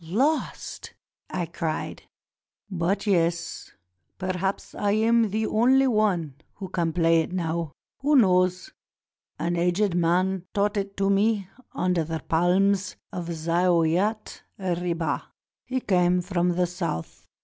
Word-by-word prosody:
"Lost?" 260 - -2 0.3
I 175 - -2
cried. 165 -1 -4 0.7
"But, 180 +3 -1
yes, 170 -4 0 0.5
perhaps 185 +1 -3
I 205 0 0
am 225 +1 +3
the 220 +2 -1
only 255 +5 +4
one 195 - +1 0.2
who 190 -2 -7
can 170 -3 0
play 165 0 +3
it 160 - -5
now. 170 -3 -2 0.3
Who 290 +2 +2
knows? 185 0 +3 0.7
An 175 +1 -1
aged 180 +3 +1
man 180 +2 +1
taught 205 +1 +1
it 200 -1 -3
to 195 0 +2
me 200 -1 +1 0.3
under 180 -2 +1
the 160 0 -4
palms 185 +4 +2 0.2
of 175 -2 -4
Zaouiat 170 +5 +1 0.2
Ribah. 175 -4 -1 0.4
He 260 +1 -1
came 180 -3 +2
from 180 -1 0
the 180 0 +2
South. 170 - -5
180 Hz, 125 wpm, -25 LUFS, 170-200 Hz, 0.7 s, only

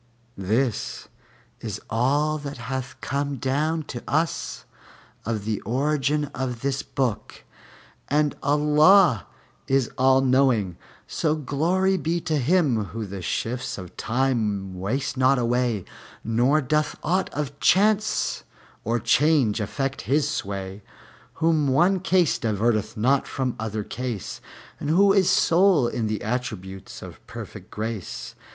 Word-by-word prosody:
This 110 +4 -1 0.5
is - - -5
all 145 +7 +1
that 145 -2 -6
hath 130 +2 -5
come 140 0 -2
down 150 +6 -1
to 125 -4 -7
us 160 +5 -1 0.6
of 110 -3 -2
the 110 -2 -2
origin 145 +4 0
of 125 -3 -4
this 135 0 -1
book, 125 -6 -3 0.6
and 150 0 +1
Allah 150 - +4 0.4
is 135 -3 +1
All 130 0 +5
knowing. 130 -8 +2 0.3
So 155 -1 0
Glory 170 +7 +1
be 170 0 -1
to 155 -2 0
Him 135 - +2
Whom 105 +1 -6
the 100 -2 -5
shifts 120 +8 -3
of 90 -3 -9
Time 110 -6 -1
waste 125 +9 -2
not 130 +1 +4
away, 120 -4 0 0.4
nor 125 +7 +2
doth 150 +3 0
aught 185 +4 +1
of 145 -1 -4
chance 210 +2 +2 0.4
or 115 +2 0
change 120 -1 +3
affect 135 +7 -3
His 145 +2 +1
sway! 100 0 -4 0.5
Whom 160 -3 +2
one 175 +8 +3
case 180 -3 +2
diverteth 110 -1 0
not 130 +6 +2
from 130 -2 -2
other 110 -1 -3
case, 120 -3 -5 0.4
and 145 - -3
Who 195 +5 +5
is 195 -3 +4
sole 170 -6 +4
in 115 -2 -2
the 105 -1 -3
attributes 105 -5 -5
of - - -11
perfect - - -9
grace. 110 -3 -5
130 Hz, 130 wpm, -24 LUFS, 115-150 Hz, 0.6 s, All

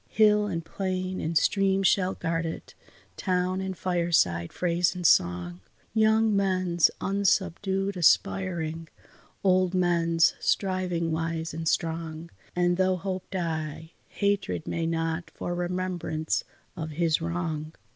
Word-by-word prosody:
Hill 210 -1 +4
and 165 -4 -3
plain 185 +1 -3
and 165 +1 0
stream 195 +1 +2
shall 190 -1 +2
guard 165 -1 -1
it, 165 -1 -6 0.4
town 185 0 0
and 190 -1 -4
fireside, 170 - +1
phrase 175 0 +1
and 180 -1 -5
song; 90 - +2 0.3
Young 220 -1 +3
men's 185 -4 +2
unsubdued 195 0 0
aspiring, 165 -2 +1 0.6
old 185 -1 +3
men's 170 -2 +3
striving 180 -4 0
wise 160 0 -2
and 165 +1 -4
strong; 165 0 -2 0.2
And 175 0 +2
though 185 0 +2
Hope 185 0 -5
die, 160 -3 -4 0.2
Hatred 200 - -1
may 165 -1 -2
not 165 0 -2
for 175 - -3
remembrance 175 -3 -2 0.3
of 160 -3 -5
his 165 0 +1
wrong. 165 -2 -3
175 Hz, 120 wpm, -27 LUFS, 165-185 Hz, 0.6 s, Hill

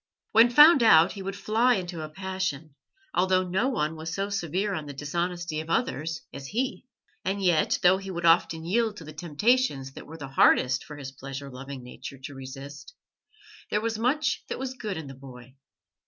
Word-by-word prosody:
When 230 +2 +7
found 295 +3 +8
out 170 -6 +6
he 200 - -7
would 195 +1 -4
fly 230 +5 +2
into 175 -4 -4
a 155 - -6
passion, 185 -4 -4 0.4
although 185 0 +2
no 190 +9 +1
one 160 - -1
was 160 +1 -6
so 195 +4 -2
severe 195 +2 -1
on 155 -5 -4
the 145 - -6
dishonesty 170 +2 -3
of 160 +1 -7
others 165 - -1
as 135 - -7
he. 250 - -3 0.4
And 195 +2 -1
yet, 175 -4 +3
though 180 +1 +6
he 195 0 -8
would 170 -2 -3
often 165 -1 +3
yield 220 +3 0
to 165 - -9
the 155 0 -10
temptations 160 - 0
that - - -11
were 160 +2 -9
the 140 -3 -7
hardest 130 -1 +4
for 150 - -9
his 135 -2 -7
pleasure 135 +1 -8
loving 135 0 -8
nature 125 +2 -9
to 135 +2 -9
resist, 135 - -10 0.7
there 210 - +1
was 220 0 -2
much 275 +6 +1
that - - -3
was 260 0 -4
good 215 -7 -5
in 160 - -6
the 135 - -9
boy. 130 -2 -13
170 Hz, 195 wpm, -27 LUFS, 145-205 Hz, 0.7 s, found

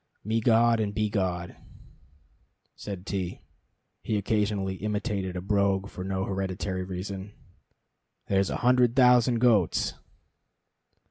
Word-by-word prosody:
"Megod 115 +1 +3
and 105 -1 -2
Begod," 95 -5 -1 1.2
said 100 -3 -7
T 95 -3 -4 0.6
(he 110 - -1
occasionally 100 -2 -1
imitated 105 -2 -3
a 90 - -3
brogue 100 0 +1
for 90 - -7
no 95 0 -2
hereditary 95 -1 -3
reason), 95 +2 -6 0.9
"there's 95 0 +1
a - - -2
hundred 125 -1 +4
thousand 125 -2 +5
goats!" 115 -8 +2
100 Hz, 105 wpm, -27 LUFS, 95-110 Hz, 1.2 s, thousand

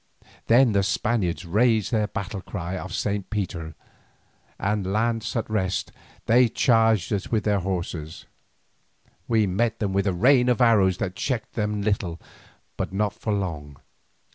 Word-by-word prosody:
Then 120 +1 +5
the 100 -1 +2
Spaniards 95 -5 -1
raised 110 +3 +2
their 110 -3 +1
battle 100 -1 -5
cry 90 -2 -5
of 95 +1 -6
Saint 100 0 -2
Peter, 90 -6 -4 0.8
and 100 -1 -1
lance 115 +3 -1
at 115 - -1
rest, 95 -4 -1 0.3
they 120 +1 +5
charged 110 - +2
us 100 - -2
with 110 -2 +1
their 105 -2 +1
horse. 85 -4 -4 1.0
We 110 -2 +3
met 110 +5 0
them 100 -3 -2
with 100 +1 +1
a - - +3
rain 125 +6 +4
of 125 - +2
arrows 105 -7 +4
that 90 -1 -3
checked 120 0 -3
them 105 -2 -1
a 100 - -3
little, 95 -5 -1 0.6
but - - -3
not 105 +1 0
for 110 - -4
long. 80 -8 -3
105 Hz, 155 wpm, -24 LUFS, 95-115 Hz, 1.0 s, Then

